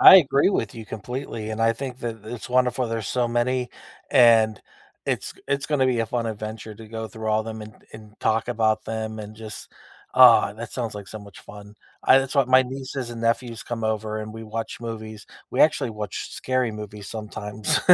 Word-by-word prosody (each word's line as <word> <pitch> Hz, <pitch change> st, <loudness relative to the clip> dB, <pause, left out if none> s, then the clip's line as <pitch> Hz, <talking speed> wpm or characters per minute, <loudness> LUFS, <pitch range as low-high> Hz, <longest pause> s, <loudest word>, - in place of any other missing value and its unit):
I 190 Hz, -, +12 dB
agree 140 Hz, -1 st, +4 dB
with 115 Hz, -, -1 dB
you 115 Hz, -, -7 dB
completely, 110 Hz, +1 st, -5 dB
and 110 Hz, +1 st, -4 dB
I 115 Hz, 0 st, +4 dB
think 125 Hz, +1 st, -6 dB
that 115 Hz, -2 st, -4 dB
it's 115 Hz, +2 st, -7 dB
wonderful 125 Hz, 0 st, +2 dB
there's 115 Hz, -3 st, -3 dB
so 125 Hz, -1 st, +1 dB
many, 125 Hz, +1 st, 0 dB, 0.4 s
and 110 Hz, -3 st, +6 dB, 0.5 s
it's -, -, -1 dB, 0.2 s
it's 140 Hz, 0 st, 0 dB
gonna 145 Hz, -4 st, +2 dB
be 125 Hz, -2 st, +2 dB
a 115 Hz, -, 0 dB
fun 115 Hz, 0 st, -1 dB
adventure 110 Hz, 0 st, -5 dB
to 110 Hz, +1 st, -11 dB
go 110 Hz, 0 st, -4 dB
through 110 Hz, +1 st, -5 dB
all 110 Hz, 0 st, +3 dB
of 110 Hz, -, -7 dB
them 110 Hz, -1 st, -5 dB
and 105 Hz, 0 st, -10 dB, 0.2 s
and 110 Hz, -1 st, -13 dB
talk 110 Hz, +1 st, +1 dB
about 110 Hz, -2 st, +1 dB
them 110 Hz, 0 st, -4 dB
and 105 Hz, 0 st, -7 dB
just 110 Hz, -1 st, -9 dB, 0.5 s
ah, -, -, +8 dB
that 115 Hz, +1 st, -7 dB
sounds 115 Hz, -4 st, -3 dB
like 100 Hz, -1 st, -7 dB
so 110 Hz, -, -7 dB
much 100 Hz, -2 st, -13 dB
fun. 105 Hz, 0 st, -12 dB, 0.3 s
I 130 Hz, -, +7 dB
that's 135 Hz, +1 st, -2 dB
what 135 Hz, -3 st, +3 dB
my 130 Hz, 0 st, +7 dB
nieces 130 Hz, -1 st, -5 dB
and 115 Hz, -1 st, -6 dB
nephews 115 Hz, 0 st, 0 dB
come 115 Hz, -2 st, -4 dB
over 110 Hz, 0 st, -1 dB
and 110 Hz, 0 st, -6 dB
we 115 Hz, -, -7 dB
watch 110 Hz, +1 st, -5 dB
movies, 110 Hz, -2 st, -6 dB, 0.3 s
we 125 Hz, -, 0 dB
actually 145 Hz, -5 st, +4 dB
watch 105 Hz, -3 st, -5 dB
scary 130 Hz, -2 st, 0 dB
movies 105 Hz, -1 st, -8 dB
sometimes 105 Hz, -1 st, -2 dB
115 Hz, 205 wpm, -24 LUFS, 110-125 Hz, 0.5 s, I